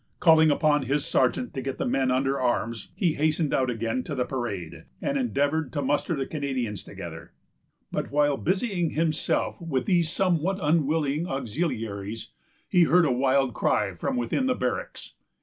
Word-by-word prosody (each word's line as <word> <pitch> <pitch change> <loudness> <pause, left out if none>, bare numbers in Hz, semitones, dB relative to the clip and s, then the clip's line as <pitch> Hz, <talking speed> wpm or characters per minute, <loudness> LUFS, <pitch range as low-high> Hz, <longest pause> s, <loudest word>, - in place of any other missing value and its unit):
Calling 160 -2 +6
upon 150 0 +3
his 140 +3 0
sergeant 130 - +1
to 135 - -3
get 135 +1 -4
the - - -2
men 135 -1 +1
under 135 +2 +1
arms, 115 -3 -1
he 175 -6 +1
hastened 155 0 0
out 130 -1 +2
again 115 +1 -1
to 145 - -4
the 125 -2 0
parade, 105 -11 -5
and 280 - -2
endeavored 160 - 0
to 145 - -1
muster 145 +5 0
the 135 -2 -2
Canadians 130 - -3
together; - - -9 0.6
but - - -2
while 145 0 +2
busying 185 - -1
himself 160 +1 0
with 150 -6 -1
these 175 -4 +2
somewhat 180 +1 +1
unwilling 155 -1 +1
auxiliaries, 115 - -3 0.4
he 180 -3 +4
heard 175 +1 +4
a 140 - +2
wild 130 0 +2
cry - - +1
from - - -3
within 120 - 0
the 255 - +2
barracks. - - -4
145 Hz, 165 wpm, -26 LUFS, 130-165 Hz, 0.6 s, Calling